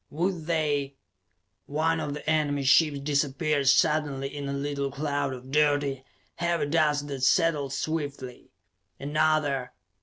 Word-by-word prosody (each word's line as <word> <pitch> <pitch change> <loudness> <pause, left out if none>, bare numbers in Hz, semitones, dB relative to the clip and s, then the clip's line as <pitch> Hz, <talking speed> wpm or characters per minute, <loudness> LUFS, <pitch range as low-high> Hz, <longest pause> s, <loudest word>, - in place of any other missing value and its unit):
Would 170 +1 -2
they 145 -4 0 0.7
One 160 +3 0
of 145 -2 -3
the 150 - -9
enemy 150 -3 +1
ships 145 +2 +4
disappeared 145 0 0
suddenly 145 -2 +1
in 140 -1 -4
a - - -2
little 140 0 -2
cloud 140 0 -2
of 130 0 -9
dirty, 145 -2 +1 0.3
heavy 170 -3 0
dust 150 -1 +1
that 135 -2 -5
settled 150 -1 +2
swiftly. 145 -4 -4 0.5
Another 145 -3 0
145 Hz, 125 wpm, -27 LUFS, 140-155 Hz, 0.7 s, ships